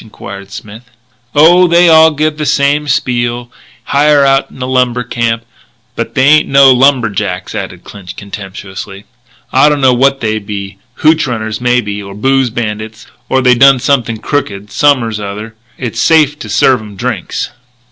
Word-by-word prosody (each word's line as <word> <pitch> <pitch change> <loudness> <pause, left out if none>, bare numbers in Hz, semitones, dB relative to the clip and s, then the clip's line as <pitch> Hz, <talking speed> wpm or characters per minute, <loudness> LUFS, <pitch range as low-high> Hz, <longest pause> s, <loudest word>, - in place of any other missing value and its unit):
enquired 100 -2 -11
Smith. 110 +3 -11 0.5
"Oh, 175 +5 +5
they 170 +1 +4
all 160 -1 +6
give 155 0 -2
the 150 - -2
same 145 +1 +1
spiel 120 -3 -2 0.3
hire 145 0 +2
out 135 0 +1
in - - -16
a 125 - -3
lumber 125 -1 0
camp. 115 -1 -2 0.5
But - - -5
they 130 - +2
ain't 155 +1 +4
no 135 -1 +6
lumberjacks," 110 -8 0
added - - -6
Clinch 90 -3 -11
contemptuously. 100 0 -9 0.5
"I 135 +3 +5
don't 150 -1 0
know 130 -2 +3
what 135 +2 +2
they 110 -1 -2
be 100 -1 -7 0.2
hootch 155 -1 +3
runners 110 -2 -4
maybe 120 -5 -1
or 100 -1 -10
booze 135 +3 +1
bandits 110 -1 -5 0.2
or 130 - +1
they 125 -1 +5
done 135 +2 +5
something 120 -4 0
crooked 105 -7 -4
som'ers 125 -7 +1
r'other. 105 +2 -7 0.2
It's 125 -3 -5
safe 150 -2 +3
to 115 - -8
serve 120 +3 +2
'em 105 -2 -11
drinks." 120 -5 -4
125 Hz, 160 wpm, -12 LUFS, 105-140 Hz, 0.5 s, all